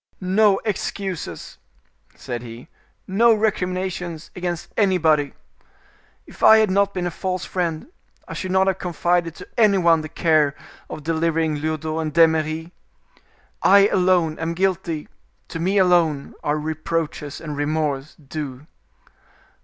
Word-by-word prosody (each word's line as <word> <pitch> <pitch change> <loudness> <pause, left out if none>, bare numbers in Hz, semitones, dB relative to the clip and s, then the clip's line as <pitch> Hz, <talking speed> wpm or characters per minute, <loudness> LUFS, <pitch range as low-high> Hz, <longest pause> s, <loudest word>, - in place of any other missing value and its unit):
"No 195 +2 +3
excuses," 190 - -4 0.6
said 120 -1 -6
he, 120 +3 -10 0.4
"no 225 +4 +4
recriminations 185 -5 -2
against 175 -2 -4
anybody. 160 -8 +2 0.9
If - - -15
I 220 - +8
had 215 -3 +3
not 200 +1 +2
been 180 -1 -2
a 175 - -2
false 185 +2 -3
friend 170 -4 -2 0.4
I - - -7
should 185 - -4
not 190 +1 +3
have 190 -1 0
confided 175 0 0
to - - -11
any 210 -3 +5
one 170 -3 +4
the 155 - -7
care 155 -3 +2 0.3
of 155 - -7
delivering 160 -1 0
Lyodot 155 +1 -2
and 155 -1 -3
D'Eymeris. 160 0 +2 0.9
I 200 +1 +6
alone 180 -4 +2
am 165 +1 -2
guilty; 170 -4 -1 0.4
to 165 - -5
me 190 +4 +1
alone 170 -6 +2
are 150 +1 0
reproaches 155 -1 -3
and 150 -2 -6
remorse 145 -1 -2
due. 145 -2 -7
165 Hz, 130 wpm, -22 LUFS, 155-185 Hz, 0.9 s, I